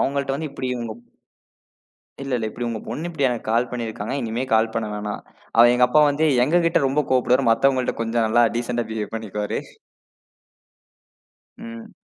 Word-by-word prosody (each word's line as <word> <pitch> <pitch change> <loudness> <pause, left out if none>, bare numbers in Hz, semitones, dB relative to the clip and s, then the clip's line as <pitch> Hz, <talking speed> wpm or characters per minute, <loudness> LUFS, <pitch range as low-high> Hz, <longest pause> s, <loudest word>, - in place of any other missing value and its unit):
அவங்கள்ட்ட 140 0 0
வந்து 155 0 -5
இப்படி 130 - -4
உங்கப் 115 0 -7 1.2
இல்ல, 135 - -6
இல்ல. 110 - -2
இப்டி 120 +2 -5
உங்க 115 -2 -3
பொண்ணு 165 +3 -4
இப்டி 155 -5 0
எனக்கு 120 -3 -4
கால் 120 +2 +2
பண்ணிருக்காங்க. 115 0 -4
இனிமே 115 +2 -2
கால் 110 0 +3
பண்ண 115 -2 -1
வேணாம். 105 0 -4 0.4
அவ 115 - +9
எங்க 125 0 +5
அப்பா 150 +4 +4
வந்து 150 +3 +1 0.2
எங்ககிட்ட 165 +2 +2
ரொம்ப 145 +3 +1
கோவப்படுவார். 130 0 +3
மத்தவங்கள்ட்ட 130 +2 +2
கொஞ்சம் 115 0 0
நல்லா 120 +2 +4
டீசண்ட்டா 120 0 -2
பிஹேவ் 110 0 -4
பண்ணிக்குவாரு. 105 -1 -3 2.0
ம். 115 0 -9
120 Hz, 155 wpm, -22 LUFS, 115-135 Hz, 2.0 s, அவ